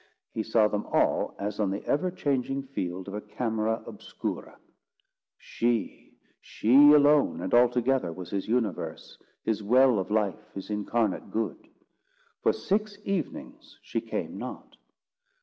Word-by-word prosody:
He 110 - -2
saw 110 0 +3
them 105 0 -3
all - - +1
as 105 +1 -4
on 105 -3 +1
the 100 +2 -4
ever 160 +6 +1
changing 135 -5 -1
field 95 -8 -5
of 100 - -6
a 105 - -4
camera 110 +1 -2
obscura. 105 -3 -6 0.8
She—she 120 0 -2 0.2
alone 145 0 +5
and - - -4
altogether—was 120 -7 +2
his 100 -1 -2
universe, 115 -5 -2 0.2
his 110 -1 -1
well 125 +2 +4
of 95 - -3
life, 105 0 -1
his 95 +2 -6
incarnate 105 0 -1
good. 110 +1 -3 0.7
For - - +4
six 210 +1 -1
evenings 195 0 -4
she - - -3
came - - -4
not. - - -8
110 Hz, 130 wpm, -28 LUFS, 105-130 Hz, 0.8 s, alone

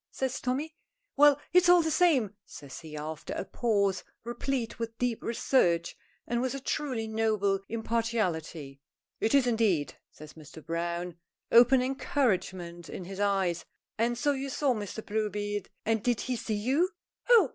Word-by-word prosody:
says 265 -1 -3
Tommy. 275 +5 -2 0.4
"Well, 290 0 +6
it's 360 0 +6
all 355 -1 +7
the 320 - 0
same," 280 - +3
says 140 -8 -10
he, 155 -2 -9
after 155 +1 -5
a - - -3
pause, 200 -5 0 0.2
replete 240 0 -3
with 230 0 -4
deep 245 -2 -1
research 175 -8 +1 0.3
and 240 0 -1
with 260 +1 -1
a - - -4
truly 260 -4 -2
noble 215 -3 +1
impartiality. 200 -11 -2 0.4
"It 225 +5 +2
is, 275 -2 +5
indeed!" 220 -11 +1 0.2
says 155 0 -13
Mr. 155 0 -13
Browne, 170 +1 -3 0.3
open 245 +2 +7
encouragement 190 - -1
in 185 - -6
his 195 +2 -8
eye. 195 -3 +2 0.5
"And 235 +1 +1
so 290 +4 +2
you 275 0 -3
saw 270 0 +1
Mr. 215 0 -6
Bluebeard! 205 -1 -2 0.2
And 225 -1 +1
did 245 -3 +1
he 255 - -2
see 220 -2 -2
you?" 265 - +1 0.4
"Oh! 445 - +7
225 Hz, 155 wpm, -29 LUFS, 185-260 Hz, 0.5 s, all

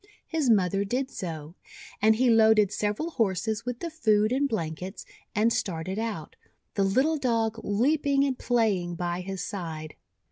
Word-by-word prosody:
His 315 -6 0
mother 195 -2 +3
did 255 +6 -2
so; 160 -3 -6 0.5
and 220 +1 +5
he 250 +3 +2
loaded 220 -3 +5
several 210 +11 -1
Horses 220 - -1
with 245 -1 -4
the 340 - -4
food 215 -8 +2
and 275 +2 +1
blankets, 185 -1 -4 0.3
and 225 +2 +3
started 185 +2 -2
out, 220 -9 -4 0.4
the 200 - +1
little 260 +11 +2
Dog 230 -4 0
leaping 275 +6 +2
and 275 -2 0
playing 210 -9 0
by 175 +1 -2
his 190 0 -5
side. 160 -6 -5
215 Hz, 150 wpm, -27 LUFS, 185-245 Hz, 0.5 s, and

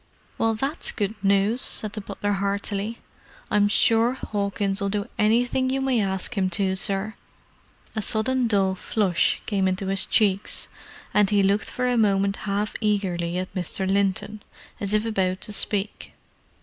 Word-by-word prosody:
"Well, 225 0 +2
that's 275 +8 -1
good 205 -1 -2
news," 200 +5 +2
said 215 -2 -1
the 215 - -5
butler 205 +1 -3
heartily. 200 +2 -2 0.5
"I'm 205 0 +4
sure 230 +4 +3 0.2
'Awkins'll 200 0 -1
do 205 0 -2
anything 245 +4 +2
you 265 +1 0
may 265 -4 +1
ask 190 -2 -2
'im 190 -2 +1
to, 190 -1 +1
sir." 195 +2 0 0.8
A 215 - -1
sudden 240 +4 0
dull 195 -3 +2
flush 190 -2 0
came 195 -3 +1
into 185 +1 -1
his 195 0 +1
cheeks, 200 -2 +1 0.4
and 210 -2 +4
he 205 -1 +3
looked 200 +2 +1
for 250 - -2
a 245 -1 +2
moment 200 -2 +2
half 205 +1 -1
eagerly 180 -5 0
at 185 +1 -4
Mr. 185 +1 -2
Linton, 200 +2 0 0.4
as 200 +1 -1
if 215 +1 +1
about 190 -4 0
to - - -5
speak. 205 0 +1
205 Hz, 155 wpm, -24 LUFS, 195-220 Hz, 0.8 s, I'm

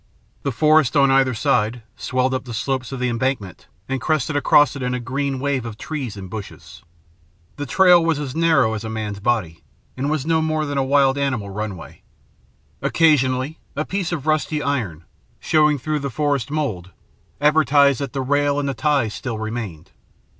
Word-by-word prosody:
The 140 - -2
forest 155 +2 +3
on 140 -1 +5
either 135 -2 +3
side 120 -2 0
swelled 130 +5 -1
up 130 - -3
the 120 -3 -6
slopes 130 +2 -2
of 135 - -5
the 125 - 0
embankment 120 -5 -3 0.2
and 135 -1 -3
crested 155 -1 0
across 145 -1 +4
it 140 - -6
in 125 0 -1
a - - -2
green 135 +2 -2
wave 135 -2 -1
of 115 -2 -7
trees 130 -6 -5
and 95 -1 -7
bushes. 105 +1 -9 0.8
The 145 -1 -4
trail 180 -3 +5
was 165 -2 +1
as 145 -2 -5
narrow 160 -9 +3
as 110 0 -4
a 110 - -5
man's 105 -2 -4
body, 100 -8 -1 0.3
and 135 +3 -2
was 155 -2 -1
no 160 0 +2
more 155 -1 0
than 145 -1 -2
a - - +2
wild 135 0 +3
animal 125 -8 -2
runway. 100 -4 -6 0.8
Occasionally, 140 -2 +2 0.2
a 155 +2 -2
piece 190 -3 -2
of 155 -5 -3
rusty 155 -1 0
iron, 105 - -2 0.4
showing 150 -1 +3
through 150 +3 -2
the 140 0 -3
forest 140 -2 -1
mould, 125 - -3 0.5
advertised 145 -2 +4
that 140 -4 -4
the 135 - -2
rail 145 +1 +1
and 140 - -2
the 140 - -1
ties 125 -2 0
still 120 -4 -4
remained. 110 -7 -6
135 Hz, 180 wpm, -21 LUFS, 115-150 Hz, 0.8 s, on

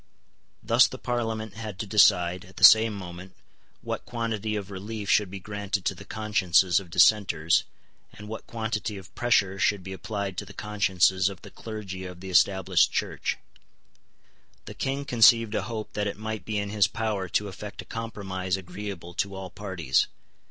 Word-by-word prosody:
Thus - - +5
the - - -8
Parliament 110 -3 -3
had 110 -2 -7
to 105 - -4
decide, 90 -4 +4
at 95 +1 -17
the - - -5
same 110 0 +9
moment, 90 -1 -9 0.5
what - - -4
quantity 110 -2 -3
of 100 -1 -5
relief 105 +2 -4
should 105 -3 +3
be 95 +1 -7
granted 100 0 -4
to - - +1
the 100 +1 -12
consciences 95 -4 +2
of 95 -3 -12
dissenters, 85 -4 +4 0.5
and 105 +1 -11
what 110 +1 -7
quantity 110 -2 -3
of 95 -2 -12
pressure 100 -5 +2
should 100 -1 +1
be 95 +1 -6
applied 100 0 -4
to - - -6
the - - -13
consciences 95 -2 +2
of 95 -3 -11
the - - -11
clergy 105 -4 -7
of 90 -1 -9
the 95 +1 -7
Established 95 +1 +3
Church. - - -2 1.3
The - - -8
King 135 +1 -3
conceived 115 -3 +5
a - - 0
hope 110 -2 -5
that 105 0 -1
it 100 - -4
might 110 0 -5
be 110 -1 -2
in 100 0 -2
his 105 -2 +3
power 105 -3 -3
to 105 +4 0
effect 100 +2 -8
a - - -23
compromise 95 -5 -4
agreeable 90 -1 -7
to 100 +2 -2
all 95 -1 -7
parties. 90 -10 0
100 Hz, 175 wpm, -26 LUFS, 95-110 Hz, 1.3 s, same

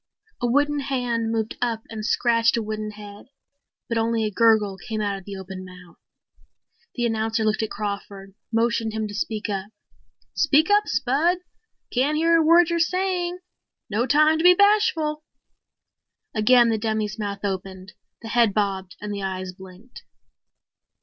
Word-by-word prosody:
A 245 - +1
wooden 290 +4 +2
hand 245 -4 -1
moved 225 -1 -2
up 230 -2 -1
and 220 -1 -6
scratched 230 0 +2
a 230 - -1
wooden 215 0 -4
head. 205 0 -11 0.6
But 230 -2 -1
only 225 0 0
a 210 - -2
gurgle 210 -2 +3
came 220 -2 -5
out 205 -1 -1
of 195 -2 -10
the 200 - -7
open 190 0 -8
mouth! 180 -1 -14 1.0
The 240 - -1
announcer 225 0 0
looked 215 0 +1
at 220 - -2
Crawford, 200 -1 -6 0.2
motioned 230 -1 0
him 220 -1 -2
to 205 - -9
speed 215 +1 -3
up. 195 0 -4 0.6
"Speak 305 +4 +3
up, 415 0 +4
Spud. 300 +8 +1 0.6
Can't 280 +5 +1
hear 330 +1 +3
a 325 - +3
word 335 +1 +5
you're 340 - +1
saying. 360 0 -1 0.5
No 230 +5 0
time 305 +4 +4
to - - -1
be 360 0 +8
bashful." 325 -7 +2 1.1
Again 235 +2 +5
the 220 -1 0
dummy's 215 -1 -2
mouth 200 -1 -4
opened, 190 -1 -5 0.3
the 225 - -7
head 230 -3 +3
bobbed 195 -3 -1
and 210 0 -4
the 200 - -4
eyes 185 -1 -4
blinked. 190 +5 -14
225 Hz, 160 wpm, -23 LUFS, 205-270 Hz, 1.1 s, be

